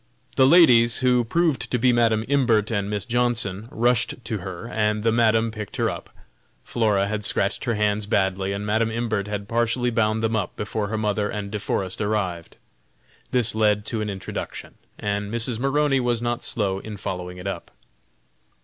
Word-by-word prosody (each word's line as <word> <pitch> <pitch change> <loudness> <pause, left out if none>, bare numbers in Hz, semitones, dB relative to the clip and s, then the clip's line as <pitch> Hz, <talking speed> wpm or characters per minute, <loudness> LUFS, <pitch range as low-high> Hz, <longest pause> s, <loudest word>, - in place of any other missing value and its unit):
The 130 -1 +5
ladies, 125 -8 +6
who 125 -1 +4
proved 160 +4 0
to 125 - 0
be 125 +1 +3
Madam 115 -2 +2
Imbert 120 -6 +2
and 100 -2 -1
Miss 105 -1 -2
Johnson, 115 -4 0
rushed 120 +1 +1
to 110 - -2
her, 95 +3 -7
and 105 -2 0
the 115 - +3
Madam 115 0 +2
picked 105 -2 -7
her - - +1
up. - - -8 0.5
Flora 105 -4 +1
had 105 0 -3
scratched 100 0 0
her 120 -2 0
hands 105 0 0
badly, 95 -1 0
and 100 +1 -4
Madam 110 +2 +1
Imbert 110 -3 -2
had 105 -1 -4
partially 120 +2 0
bound 110 -1 +1
them 115 0 +1
up 105 -4 -2
before 105 0 -3
her 110 +2 -3
mother 105 -1 0
and 100 -1 -5
De 105 - -3
Forest 95 -1 -2
arrived. 95 -5 -2 0.7
This 125 -3 +2
led 105 -1 +2
to 110 -1 -2
an 105 - -2
introduction, 95 -1 -6 0.2
and 105 0 -3
Mrs. 115 0 -2
Maroney 135 +1 +2
was 120 -2 0
not 120 0 -2
slow 100 -4 -1
in 105 0 -8
following 90 -2 -5
it 90 - -9
up. 95 -3 -5
110 Hz, 180 wpm, -23 LUFS, 100-120 Hz, 0.7 s, ladies